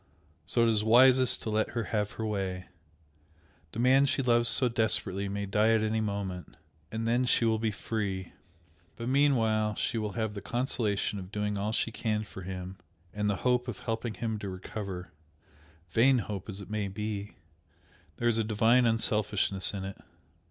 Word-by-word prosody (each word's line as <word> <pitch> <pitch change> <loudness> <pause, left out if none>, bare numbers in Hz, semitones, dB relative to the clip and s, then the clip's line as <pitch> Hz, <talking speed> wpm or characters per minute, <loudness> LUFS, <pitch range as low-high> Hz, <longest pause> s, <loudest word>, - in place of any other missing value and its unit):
So 120 - +2
it 115 - +4
is 105 -2 +2
wisest 125 +3 +5
to 110 - -3
let 110 0 +1
her 115 - +1
have 105 -1 0
her 110 - -4
way. 95 -3 -3 1.0
The - - -8
man 130 +3 +5
she 135 - 0
loves 120 -1 +3
so 125 +1 +2
desperately 105 -4 -1
may 100 +1 -3
die 105 +3 +3
at 110 - +1
any 110 0 0
moment, 100 -5 -4 0.3
and 110 +1 -2
then 120 +2 +2
she 120 - +3
will 110 -1 +2
be 110 0 0
free. 100 -3 -3 0.6
But 115 +1 -4
meanwhile 115 -6 +2
she 115 - -1
will 105 -2 -3
have 110 -2 -2
the 100 - -6
consolation 110 -3 0
of 95 0 -9
doing 105 0 -1
all 100 +2 -1
she 115 +1 -1
can 110 -1 -1
for 100 -2 -10
him, 95 0 -6 0.3
and 105 0 0
the 100 - +1
hope 125 0 +2
of 120 -6 -5
helping 115 -1 -3
him 110 -2 -3
to 100 - -5
recover; 95 -1 -6 0.8
vain 130 +3 +5
hope 105 -3 -4
as 100 0 -5
it 100 - -10
may 105 -2 -1
be, 105 +1 -5 0.8
there 120 - 0
is 115 -1 +2
a - - +2
divine 115 +3 +4
unselfishness 105 -3 +1
in 100 -2 -5
it. 95 - -7
110 Hz, 180 wpm, -29 LUFS, 100-115 Hz, 1.0 s, wisest